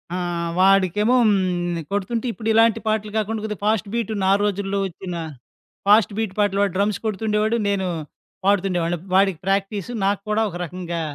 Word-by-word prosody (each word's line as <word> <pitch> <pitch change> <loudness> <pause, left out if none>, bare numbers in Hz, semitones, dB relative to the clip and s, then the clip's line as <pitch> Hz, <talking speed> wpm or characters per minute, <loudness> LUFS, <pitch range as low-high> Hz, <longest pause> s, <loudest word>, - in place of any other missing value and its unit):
ఆహ్, 175 -2 -2
వాడికేమో 195 +5 +4
హ్మ్. 175 -4 0
కొడుతుంటే 205 +4 -2
ఇప్పుడు 220 -1 -4
ఇలాంటి 225 0 +4
పాటలు 215 -1 0
కాకుండా 220 0 -1
కొద్దిగా 210 -3 -5
ఫాస్ట్ 215 -2 +1
బీట్ 230 -2 -1
నా 190 - +4
రోజుల్లో 200 -1 -1
వచ్చిన 180 0 -7 0.7
ఫాస్ట్ 210 0 +5
బీట్ 220 -4 -2
పాటలు 200 -1 +2
వాడు 200 -3 0
డ్రమ్స్ 200 0 +1
కొడుతుండేవాడు. 215 +1 0
నేను 195 -2 0 0.6
పాడుతుండేవాడిని. 180 -4 +1 0.2
వాడికి 195 -3 +3
ప్రాక్టీస్ 195 +1 -1
నాకు 200 0 +1
కూడా 215 +1 +2
ఒక 175 - -7
రకంగా 175 0 -5
200 Hz, 150 wpm, -22 LUFS, 185-215 Hz, 0.7 s, ఫాస్ట్